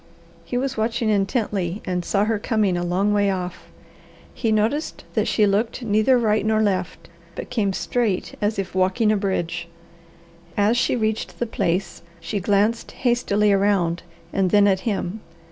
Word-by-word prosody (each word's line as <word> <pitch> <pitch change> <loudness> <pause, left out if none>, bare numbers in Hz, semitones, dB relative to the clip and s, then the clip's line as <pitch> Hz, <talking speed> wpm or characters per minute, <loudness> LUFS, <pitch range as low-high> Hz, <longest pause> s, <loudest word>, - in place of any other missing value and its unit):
He 245 - -3
was 270 0 -2
watching 225 0 0
intently 200 -2 0
and 180 -1 -2
saw 200 +3 +1
her 220 -1 0
coming 210 -4 +1
a 175 - -1
long 190 +4 +1
way 205 -1 +2
off. 180 -2 -4 0.7
He 225 - -1
noticed 220 +9 0
that - - +1
she 215 - +3
looked 215 +5 0
neither 215 +4 +3
right 215 -2 +2
nor 215 0 +2
left, 190 -4 -1 0.3
but - - -7
came 215 -5 +1
straight 215 0 -1
as 210 0 0
if 195 -1 -3
walking 190 +4 +2
a - - +3
bridge. 175 -4 -2 0.9
As 205 +3 +3
she 240 - +1
reached 220 -2 -2
the 240 - -1
place 195 -4 -2 0.2
she 200 +5 -3
glanced 205 +4 +1
hastily 210 -4 +1
around 195 -4 +1 0.3
and 190 -2 +2
then 205 +2 +5
at 190 -2 +3
him. 200 0 -3
205 Hz, 160 wpm, -22 LUFS, 190-220 Hz, 0.9 s, then